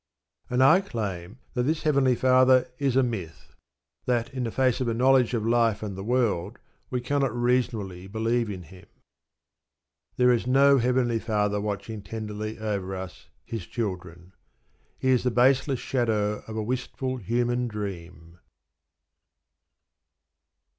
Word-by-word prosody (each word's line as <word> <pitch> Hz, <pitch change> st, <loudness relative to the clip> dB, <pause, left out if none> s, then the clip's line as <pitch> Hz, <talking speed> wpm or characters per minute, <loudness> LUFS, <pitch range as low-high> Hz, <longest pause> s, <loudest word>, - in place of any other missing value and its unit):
And 125 Hz, +1 st, +2 dB
I 180 Hz, +8 st, +6 dB
claim 105 Hz, -, -5 dB, 0.2 s
that 125 Hz, -, 0 dB
this 155 Hz, +5 st, -1 dB
Heavenly 140 Hz, -5 st, +3 dB
Father 130 Hz, +1 st, +4 dB
is 135 Hz, -3 st, 0 dB
a 135 Hz, -, +4 dB
myth: 95 Hz, -10 st, -5 dB, 0.5 s
that 120 Hz, -1 st, 0 dB
in 125 Hz, -3 st, -2 dB
face 130 Hz, +1 st, +1 dB
of 125 Hz, -, 0 dB
a 115 Hz, -, 0 dB
knowledge 125 Hz, 0 st, +3 dB
of 110 Hz, -2 st, -2 dB
life 115 Hz, -2 st, +2 dB
and 100 Hz, -3 st, -5 dB
the 95 Hz, -, -6 dB
world 110 Hz, -4 st, 0 dB, 0.3 s
we 125 Hz, -, -1 dB
cannot 135 Hz, -2 st, 0 dB
reasonably 115 Hz, -7 st, -1 dB
believe 115 Hz, +2 st, -1 dB
in 95 Hz, -3 st, -6 dB
Him. 90 Hz, +3 st, -15 dB, 1.3 s
There 125 Hz, 0 st, +5 dB
is 120 Hz, 0 st, 0 dB
no 140 Hz, +1 st, +5 dB
Heavenly 120 Hz, -1 st, +1 dB
Father 105 Hz, -2 st, 0 dB
watching 105 Hz, +1 st, -4 dB
tenderly 110 Hz, +1 st, -6 dB
over 100 Hz, -4 st, -3 dB
us, 95 Hz, -8 st, -9 dB, 0.2 s
His 110 Hz, -6 st, -6 dB
children. 90 Hz, -5 st, -5 dB, 0.6 s
He 130 Hz, -, -1 dB
is 130 Hz, -2 st, +4 dB
the 125 Hz, -, +1 dB
baseless 130 Hz, +3 st, +3 dB
shadow 105 Hz, -5 st, 0 dB
of 110 Hz, 0 st, -6 dB
a 110 Hz, -, -1 dB
wistful 130 Hz, +2 st, -3 dB
human 120 Hz, +2 st, -1 dB
dream. 90 Hz, -6 st, -7 dB
115 Hz, 140 wpm, -26 LUFS, 105-125 Hz, 1.3 s, I